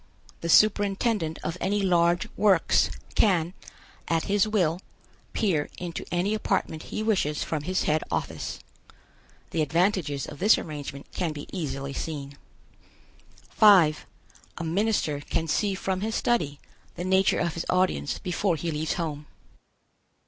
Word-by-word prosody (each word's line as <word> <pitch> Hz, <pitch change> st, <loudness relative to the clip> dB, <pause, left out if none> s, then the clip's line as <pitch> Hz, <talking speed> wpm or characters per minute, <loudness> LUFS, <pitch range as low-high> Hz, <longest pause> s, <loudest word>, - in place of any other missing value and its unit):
The 170 Hz, -, -4 dB
superintendent 205 Hz, -3 st, +3 dB
of 170 Hz, +2 st, -4 dB
any 205 Hz, +1 st, 0 dB
large 175 Hz, -1 st, +3 dB
works 195 Hz, -4 st, +3 dB, 0.2 s
can, 180 Hz, -5 st, +2 dB, 0.5 s
at 165 Hz, -1 st, +1 dB
his 205 Hz, +1 st, +2 dB
will, 180 Hz, -5 st, +1 dB, 0.5 s
peer 170 Hz, -9 st, 0 dB
into 175 Hz, -2 st, -5 dB
any 180 Hz, +4 st, +1 dB
apartment 190 Hz, -7 st, -1 dB
he 215 Hz, -, -3 dB
wishes 180 Hz, -9 st, +1 dB
from 155 Hz, -2 st, -3 dB
his 185 Hz, +5 st, -1 dB
head 155 Hz, +1 st, +1 dB
office. -, -, -3 dB, 0.9 s
The 165 Hz, -, 0 dB
advantages 160 Hz, -2 st, +1 dB
of -, -, -10 dB
this 210 Hz, +3 st, +5 dB
arrangement 145 Hz, -3 st, -6 dB
can 170 Hz, -4 st, -2 dB
be 145 Hz, -1 st, -7 dB
easily 140 Hz, -5 st, -3 dB
seen. 140 Hz, -3 st, -5 dB, 1.1 s
5. 185 Hz, -8 st, +5 dB, 0.5 s
A -, -, -4 dB
minister 170 Hz, -3 st, 0 dB
can 165 Hz, +3 st, -2 dB
see 200 Hz, +5 st, +1 dB
from 190 Hz, 0 st, -2 dB
his 220 Hz, +2 st, -2 dB
study 150 Hz, -13 st, 0 dB, 0.4 s
the 175 Hz, -, -4 dB
nature 190 Hz, +1 st, +3 dB
of 170 Hz, -2 st, 0 dB
his 165 Hz, -, -5 dB
audience 180 Hz, -, +1 dB
before 180 Hz, 0 st, 0 dB
he 165 Hz, +1 st, -3 dB
leaves 155 Hz, +1 st, -1 dB
home. 150 Hz, -4 st, -4 dB
175 Hz, 135 wpm, -26 LUFS, 155-195 Hz, 1.1 s, this